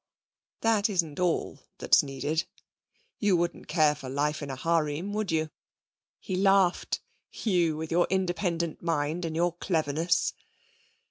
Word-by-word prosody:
'That 220 Hz, -2 st, +3 dB
isn't 170 Hz, -7 st, -1 dB
all 180 Hz, -2 st, 0 dB, 0.2 s
that's -, -, +5 dB
needed. 145 Hz, +4 st, -2 dB, 0.7 s
You 205 Hz, -4 st, +3 dB
wouldn't 170 Hz, 0 st, -2 dB
care 155 Hz, -3 st, +3 dB
for 135 Hz, -3 st, -8 dB
life 150 Hz, +3 st, -1 dB
in 145 Hz, -, -5 dB
a 135 Hz, -, -4 dB
harem, 165 Hz, +5 st, 0 dB
would 215 Hz, -3 st, -1 dB
you?' 160 Hz, -1 st, 0 dB, 0.7 s
He 185 Hz, -, -4 dB
laughed. 195 Hz, -1 st, +2 dB, 0.3 s
'You 175 Hz, -7 st, +1 dB
with 160 Hz, +1 st, -5 dB
your 175 Hz, +1 st, +3 dB
independent 175 Hz, -3 st, -1 dB
mind 165 Hz, +1 st, -1 dB
and 160 Hz, -1 st, -4 dB
your 175 Hz, +1 st, +1 dB
cleverness.' 165 Hz, -1 st, 0 dB
170 Hz, 135 wpm, -28 LUFS, 155-180 Hz, 0.7 s, that's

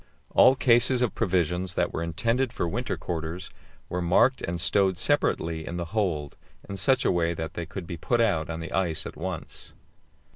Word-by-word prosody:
All 130 Hz, -, +6 dB
cases 125 Hz, 0 st, +4 dB
of 120 Hz, -, 0 dB
provisions 90 Hz, -2 st, 0 dB
that -, -, 0 dB
were -, -, -2 dB
intended 115 Hz, +10 st, 0 dB
for 85 Hz, -, -2 dB
winter 120 Hz, +8 st, -3 dB
quarters 85 Hz, +1 st, -5 dB, 0.4 s
were 90 Hz, -, -3 dB
marked 95 Hz, +9 st, +3 dB
and 85 Hz, 0 st, -3 dB
stowed 95 Hz, +2 st, +2 dB
separately 80 Hz, -1 st, 0 dB
in 85 Hz, +2 st, -5 dB
the 85 Hz, -, -3 dB
hold 85 Hz, -10 st, -1 dB, 0.3 s
in 100 Hz, -, -5 dB
such 130 Hz, +8 st, +2 dB
a -, -, +4 dB
way 85 Hz, -1 st, 0 dB
that 80 Hz, -1 st, -5 dB
they 85 Hz, -2 st, -5 dB
could 95 Hz, +1 st, -7 dB
be 85 Hz, 0 st, -6 dB
put 120 Hz, +8 st, 0 dB
out 95 Hz, -10 st, +1 dB
on 85 Hz, 0 st, -4 dB
to -, -, -5 dB
the -, -, -9 dB
ice 80 Hz, -4 st, 0 dB
at -, -, -7 dB
once. -, -, -7 dB
90 Hz, 195 wpm, -26 LUFS, 85-110 Hz, 0.4 s, All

